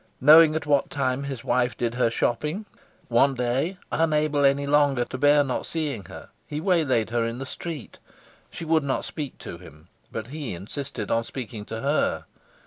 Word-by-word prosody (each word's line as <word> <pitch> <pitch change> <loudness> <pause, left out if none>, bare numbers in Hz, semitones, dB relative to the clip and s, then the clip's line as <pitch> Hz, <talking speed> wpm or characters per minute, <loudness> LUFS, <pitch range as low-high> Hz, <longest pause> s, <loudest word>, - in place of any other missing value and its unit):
Knowing 155 +3 +8
at 160 - -2
what 145 -1 +2
time 135 0 -1
his 135 -4 -5
wife 125 -1 +1
did 120 -1 -1
her 120 -1 +2
shopping, 150 - -1 0.4
one 135 +3 +3
day, 130 +9 -1
unable 150 -2 +2
any 140 +1 +3
longer 140 -3 +3
to - - -8
bear 145 +2 +5
not 130 -3 -2
seeing 145 -10 -3
her, - - -11 0.2
he 150 - -4
waylaid 155 - +1
her 120 -1 +1
in 115 +1 -3
the 135 - -5
street. 155 +1 -7 0.5
She 165 - -7
would 160 -1 +2
not 135 -1 -1
speak 145 -5 -6
to 85 - -8
him, 80 -1 -15 0.2
but 110 - -4
he 145 - -4
insisted 135 - -6
on 115 0 +2
speaking 115 -4 -7
to 115 +1 -6
her. 145 +3 0
140 Hz, 180 wpm, -25 LUFS, 120-150 Hz, 0.5 s, Knowing